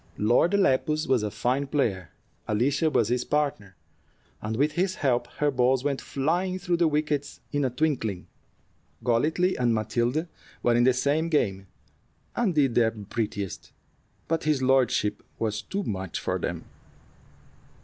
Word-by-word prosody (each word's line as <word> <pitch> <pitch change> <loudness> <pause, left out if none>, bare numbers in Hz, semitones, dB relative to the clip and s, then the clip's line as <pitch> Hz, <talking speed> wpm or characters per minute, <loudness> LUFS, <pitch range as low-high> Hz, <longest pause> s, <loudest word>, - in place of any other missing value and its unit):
Lord 120 - +3
Lepus 155 -4 +2
was 130 -4 +3
a 105 - -1
fine 130 +6 -1
player. 110 - -1 0.4
Alicia 140 +9 +2
was 115 -7 +2
his 125 0 +1
partner, 140 -11 -1 0.7
and 110 +1 -3
with 145 +3 +2
his 185 +4 0
help 120 -3 +1
her 150 -1 +2
balls 130 0 +2
went 140 -2 -1
flying 175 +7 -1
through 180 -2 -1
the 170 -1 +3
wickets 150 -1 -1
in 145 -1 0
a 130 - +2
twinkling. 125 - -1 0.8
Golightly 155 +10 +2
and 120 -2 +2
Matilda 120 +8 0 0.4
were 120 - +4
in 120 +1 +4
the 130 - +5
same 145 +6 +1
game, 100 - 0 0.7
and 210 -8 +1
did 135 -5 +3
their 115 -1 +4
prettiest; 105 -2 -5 0.5
but 165 -1 -1
his 150 -4 +1
lordship 130 -5 +2 0.2
was 110 -1 -2
too 195 - -4
much 95 - -4
for - - -2
them. - - -4
130 Hz, 150 wpm, -26 LUFS, 115-155 Hz, 0.8 s, the